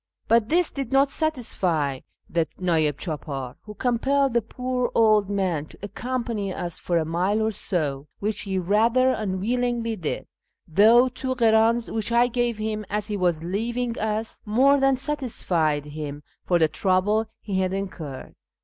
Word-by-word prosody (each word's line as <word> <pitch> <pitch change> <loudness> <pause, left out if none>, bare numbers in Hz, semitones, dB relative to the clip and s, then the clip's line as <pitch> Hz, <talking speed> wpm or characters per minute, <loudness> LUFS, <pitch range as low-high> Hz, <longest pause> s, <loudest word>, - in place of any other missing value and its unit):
But 230 -1 +3
this 345 +1 +3
did 275 -3 -5
not 275 +1 +4
satisfy 185 - 0 0.3
the 165 -1 0
nd'ih 165 -5 +2
chdpdr, 140 -5 -5
who 210 -1 -11
compelled 265 +3 +1
the 235 - +3
poor 250 +2 -2
old 215 -3 +4
man 185 -7 -1
to - - -16
accompany 230 -1 -3
us 175 -2 -4
for 175 - 0
a 160 - +1
mile 180 +6 0
or 220 0 +1
so, 150 -9 -2
which 210 +1 -2
he 195 -2 -2
rather 225 +8 +3
unwillingly 230 +3 -1
did; 170 -7 -4 0.4
though 220 +9 +6
two 260 +1 -3
h'dns 230 0 +3
which 225 +1 -2
I 235 +1 +5
gave 240 -2 -1
him 215 0 -3
as 210 +1 -2
he 210 - -1
was 175 -4 0
leaving 230 +6 -2
us 220 +1 -2
more 265 +7 +4
than 270 -1 +3
satisfied 185 - -1
him 150 -1 -6 0.2
for 175 - +3
the 160 -2 +4
trouble 195 +6 +1
he 195 -3 -2
had 185 -1 0
incurred. 180 -8 -6
215 Hz, 160 wpm, -24 LUFS, 175-240 Hz, 0.4 s, though